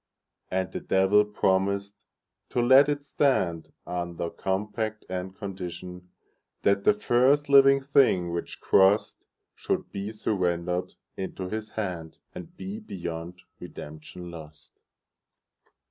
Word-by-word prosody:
And 95 0 -1
the - - -4
Devil 95 +2 +3
promised 100 0 -1 0.4
to - - -1
let 130 +4 +6
it 145 -1 -2
stand, 95 - 0
Under 85 -1 -4
compact 105 +3 -3
and 95 +1 -5
conditionThat 90 +1 -5
the 210 - +5
first 140 +1 +3
living 135 0 +6
thing 125 -11 +3
which 85 0 -5
crossedShould 100 +3 +1
be 100 +1 -4
surrendered 90 -4 -1 0.2
into 95 -1 -5
his 110 +1 -5
hand, 90 -7 -4 0.2
And 175 +2 -10
be 200 +3 -6
beyond 85 - -7 0.2
redemption 80 +4 -9
lost. 75 -2 -13
95 Hz, 105 wpm, -27 LUFS, 90-110 Hz, 0.4 s, let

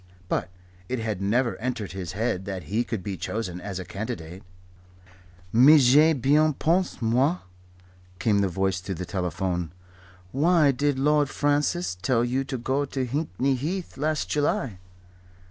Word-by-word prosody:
But - - -1 0.4
it 130 - -1
had 110 -4 -3
never 120 +5 +1
entered 120 -3 -3
his 95 -2 -6
head 100 -3 -1
that 95 -2 -5
he 105 +10 -1
could 110 -6 -4
be 100 -2 -4
chosen 90 -5 -4
as 100 -1 -5
a 95 - -5
candidate. 90 -3 -6 1.1
"Mais 140 +7 +8
j'y 145 - +8
ai - - +3
bien 150 +3 +3
pense, 175 +5 0
moi," 130 +9 +2 0.8
came 105 +1 +2
the 100 - +2
voice 95 +1 -1
through 95 +1 -5
the 90 +2 -5
telephone. 90 -2 -2 0.6
"Why 155 +1 +4
did 140 +1 0
Lord 145 +1 +2
Francis 145 - 0
tell 120 +3 +2
you 130 +2 0
to 135 -1 -4
go 130 +4 0
to 135 -2 -3
Hickney 135 - -1
Heath 170 +8 -4
last 150 +3 -1
July?" 135 -8 -1
120 Hz, 155 wpm, -25 LUFS, 95-145 Hz, 1.1 s, Mais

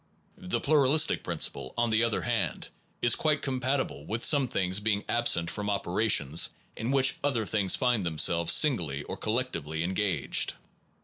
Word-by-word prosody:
The 185 -1 -3
plural 145 -1 +3
istic 155 - +2
principle, 65 - -4
on 120 -1 +1
the 110 +1 +2
other 115 -2 -1
hand, - - -2 0.3
is 120 - +5
quite 155 -2 0
com 130 -2 -2
patible 130 - -2
with 115 +2 -3
some 145 -5 +3
things 95 -3 0
being 105 -1 -1
absent 85 -8 +1
from 105 -1 -4
operations 95 -5 +1 0.3
in 115 +2 -4
which 135 -1 +2
other 125 -6 0
things 100 -3 +2
find 125 -4 +1
them 85 -4 -4
selves 85 +2 +3
singly 85 - +2
or - - -6
collectively 85 - -3
engaged. 95 +1 0
110 Hz, 165 wpm, -28 LUFS, 90-130 Hz, 0.3 s, is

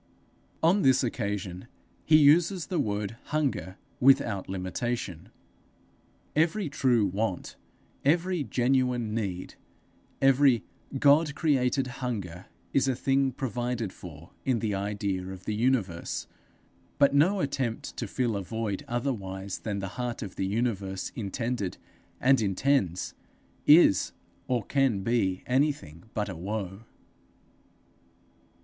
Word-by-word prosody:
'_ - - -38 0.6
On 195 +4 +4
this 130 -3 +4
occasion 100 -6 -3 0.4
he 155 - +6
uses 165 +4 +4
the 175 +3 -2
word 105 +1 -2
hunger 140 -11 -2 0.2
without 125 -8 +3
limitation. 95 0 -3 1.1
Every 165 +3 +1
true 125 -6 +2
want, 95 0 -2 0.5
every 175 +3 +2
genuine 125 -1 +1
need, 95 -5 -3 0.7
every 135 -4 +4 0.3
God 145 +2 +4
created 135 -4 +2 0.2
hunger, 100 -8 -4 0.3
is 135 0 +3
a 130 - +1
thing 135 +1 +1
provided 120 -4 -3
for 85 -1 -11
in 130 -3 +1
the 110 -2 -1
idea 100 -2 -2
of 95 -1 -9
the 105 - -1
universe; 105 -7 0 0.7
but 140 -1 +4
no 175 +8 +4
attempt 135 -6 -2
to 115 - -3
fill 120 +1 -1
a 100 - -2
void 105 0 -3
otherwise 100 -7 -3
than 105 -3 -3
the 95 +3 -6
Heart 120 -2 -3
of 95 - -8
the 95 - -1
Universe 100 -3 -2
intended 115 -1 -3 0.4
and 130 -1 +4
intends, 95 -3 +1 0.5
is 150 - +6 0.3
or 125 -3 0
can 135 -8 +1
be 95 -5 0
anything 130 - 0
but 105 -1 -1
a 95 - -5
woe. 95 +3 -5
115 Hz, 120 wpm, -28 LUFS, 95-135 Hz, 1.1 s, he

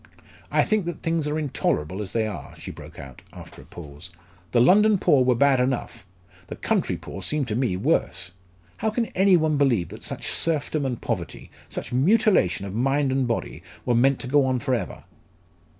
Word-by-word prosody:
"I - - +4
think 215 -4 0
that 175 - -5
things 165 -2 0
are 150 +1 -1
intolerable 100 - -1
as 100 -2 -6
they 115 0 0
are," 105 - -7
she - - -8
broke - - -12
out, 65 -2 -11
after - - -12
a - - -16
pause. 75 +1 -11 0.4
"The 120 - +3
London 205 - +5
poor 140 -7 +3
were 125 -1 +3
bad 140 +1 +4
enough; 125 -7 -2 0.4
the - - -6
country - - -1
poor 95 - -9
seem 150 +7 -1
to 110 -3 -3
me 120 -7 0
worse! 90 - -1 0.5
How 220 - 0
can 230 +2 -1
any 190 -1 +5
one 155 -2 +1
believe 120 - +2
that - - -10
such - - -5
serfdom 155 -3 +1
and 125 -3 -3
poverty - - -5 0.2
such 120 - -6
mutilation 140 - +3
of 95 - -6
mind 135 +4 +1
and 130 -1 +1
body 115 - -3 0.2
were 125 - +2
meant 130 +3 +3
to 125 - -5
go 145 +2 +4
on 130 -1 +1
for 130 +1 -1
ever!" 110 -7 -3
130 Hz, 195 wpm, -24 LUFS, 110-155 Hz, 0.5 s, London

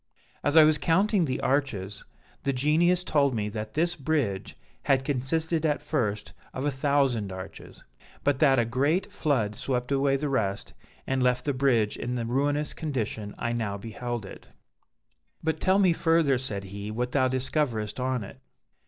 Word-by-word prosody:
As 145 +2 +2
I 160 - +10
was 155 0 +4
counting 190 +2 +2
the 130 -3 -2
arches, 105 -8 -1 0.4
the 140 - 0
Genius 165 +7 +2
told 140 -6 +2
me 105 -1 -1
that 110 +1 -6
this 170 +3 +1
bridge 140 - -2 0.3
had 135 -1 +2
consisted 155 +4 -1
at 150 -2 +1
first 115 -9 -2 0.2
of 130 - -3
a 145 - +1
thousand 135 -7 +1
arches; 95 0 -9 0.4
but 145 -2 +1
that 135 -4 +5
a 120 - +3
great 145 - 0
flood 130 - 0
swept 125 +1 -2
away 135 0 +2
the 150 +2 -2
rest 105 -8 -1 0.3
and 135 0 0
left 125 0 +1
the 145 - +1
bridge 125 -5 +2
in 125 +1 -3
the 120 -2 -2
ruinous 145 +5 0
condition 115 -8 -4
I 120 - -2
now 110 -4 -2
beheld 115 +1 -5
it. - - -11 1.0
"'But 160 0 -1
tell 190 +1 +3
me 190 -4 +4
further,' 165 -6 +2
said 105 -6 -4
he, 100 +2 -7
'what 125 +3 -2
thou 130 -2 +3
discoverest 130 -4 -1
on 130 -2 -1
it.' 130 - -11
130 Hz, 170 wpm, -27 LUFS, 115-150 Hz, 1.0 s, I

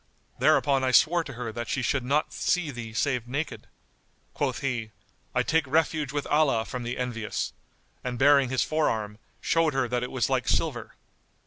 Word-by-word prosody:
Thereupon 135 -2 +3
I 130 - +2
swore 165 +6 +4
to 135 - -7
her 120 -1 -5
that 120 0 -5
she 130 - -1
should 135 +1 0
not 145 +4 0
see 180 -5 0
thee 120 -3 -7
save 125 +1 -1
naked." 145 +5 -4 0.7
Quoth 135 -4 -2
he, 120 -5 -2 0.5
"I - - +3
take 160 0 +1
refuge 155 -1 +1
with 145 0 -2
Allah 140 -7 +2
from 125 - -5
the 120 +1 -4
envious," 120 -4 -3 0.5
and 125 -1 -3
baring 140 0 +5
his 130 0 +1
forearm, 110 -9 -1 0.2
showed 165 -3 +2
her 135 -2 +1
that 125 0 0
it 125 - -3
was 120 -4 0
like - - 0
silver. - - -1
130 Hz, 180 wpm, -27 LUFS, 120-145 Hz, 0.7 s, baring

